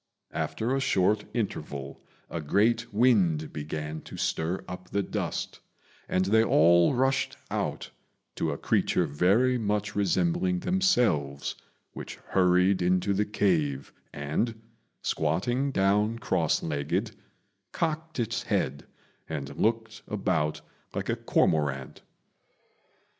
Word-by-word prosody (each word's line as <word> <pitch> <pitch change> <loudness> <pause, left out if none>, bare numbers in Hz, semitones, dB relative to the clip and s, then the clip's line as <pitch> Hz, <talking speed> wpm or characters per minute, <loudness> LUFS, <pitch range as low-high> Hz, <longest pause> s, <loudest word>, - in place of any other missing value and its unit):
After 120 +4 -1
a - - +1
short 105 -4 +2
interval 70 - -4 0.3
a 85 - -4
great 115 +9 +2
wind 100 -9 +3
began 75 +1 -5
to - - -10
stir 85 +4 -1
up 90 0 -8
the 100 0 0
dust, - - -3 0.5
and 95 0 +2
they 110 +3 +4
all 85 - +5
rushed 135 +2 +1
out - - -3 0.4
to 80 - -1
a 70 - -2
creature 90 - +1
very 100 - +2
much 105 -1 -1
resembling 175 - +1
themselves, 115 - +1 0.4
which - - -7
hurried 90 +1 +2
into 90 +3 +2
the 105 +2 +1
cave, 80 -10 0 0.2
and, 75 +11 -2 0.4
squatting 100 - 0
down 105 0 +2
cross 85 -8 0
legged, 70 -3 -1 0.6
cocked 160 -2 -2
its 115 -1 -1
head 70 +2 -1 0.4
and 75 -4 -5
looked 110 0 -1
about 90 -7 -1 0.3
like - - -3
a - - +2
cormorant. 70 -4 0
95 Hz, 115 wpm, -28 LUFS, 80-115 Hz, 0.6 s, all